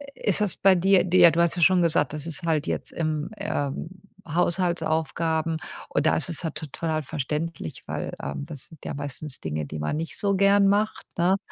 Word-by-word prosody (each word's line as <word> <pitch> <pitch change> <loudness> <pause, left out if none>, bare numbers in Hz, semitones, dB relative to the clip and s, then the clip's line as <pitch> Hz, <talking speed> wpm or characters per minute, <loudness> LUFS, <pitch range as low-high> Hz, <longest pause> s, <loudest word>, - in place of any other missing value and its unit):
ist 205 -1 +2
das 210 -4 0
bei 195 -1 +5
dir 190 +1 +4
dir? 175 -1 +7
Du 170 - +2
hast 170 -1 +2
ja - - -1
schon 185 0 +5
gesagt, 155 -3 +2
das 155 +1 -3
ist 165 +1 0
halt 155 -3 +1
jetzt - - -3
im, 155 -2 -2
ähm, 160 -6 -3 0.4
Haushaltsaufgaben 165 -2 0 0.3
und 145 - 0
da - - +4
ist 155 - -1
es 170 +1 -4
halt 160 -3 -3
total 160 +2 -4
halt 155 -2 -1
verständlich, 150 - -4
weil, - - -3
ähm, 70 - -4
das 150 -4 -10
sind 160 -4 -16
ja - - -3
meistens 145 0 -4
Dinge, 75 -1 -3
die 75 +2 -6
man 75 - -1
nicht 165 +1 -4
so 200 -1 +1
gern 200 +1 +5
macht, 210 +2 +1
ne? 180 +3 +3
165 Hz, 205 wpm, -25 LUFS, 150-180 Hz, 0.4 s, dir